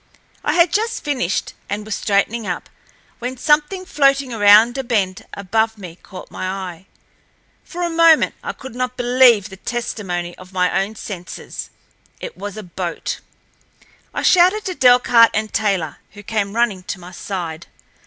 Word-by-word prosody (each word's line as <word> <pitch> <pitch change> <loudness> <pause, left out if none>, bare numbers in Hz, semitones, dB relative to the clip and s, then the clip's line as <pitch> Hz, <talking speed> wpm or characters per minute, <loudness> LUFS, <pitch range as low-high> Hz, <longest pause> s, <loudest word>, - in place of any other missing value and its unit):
I - - +1
had 340 -1 +4
just 450 +2 -1
finished, 255 - -1 0.2
and 210 +1 -3
was 215 - -4
straightening 210 +2 0
up, 175 - -4 0.5
when 250 +2 -4
something 305 +7 +1
floating 275 -5 +2
around 215 +2 +6
a - - -2
bend 200 -6 -1
above 220 +3 0
me 180 -5 -9
caught 185 - -11
my 185 - -4
eye. 185 -1 -6 0.8
For 355 0 -6
a 345 - 0
moment 330 -1 +5
I - - -4
could 265 -3 -10
not 250 +1 -3
believe 245 -4 +4
the 190 - -11
testimony 185 -7 -4
of 185 +1 -14
my 180 +1 +2
own 210 +3 -8
senses. 185 -5 -7 0.5
It - - -7
was 205 0 -7
a 215 - -6
boat. 175 -1 -4 0.9
I - - -4
shouted 370 +4 +4
to 370 - -2
Delcarte 245 -4 +5
and 215 0 -3
Taylor, 195 -8 0 0.2
who 205 0 -12
came 205 -1 -2
running 230 -5 +1
to 185 +1 -6
my 180 0 -11
side. 175 -3 -5
220 Hz, 160 wpm, -19 LUFS, 190-255 Hz, 0.9 s, around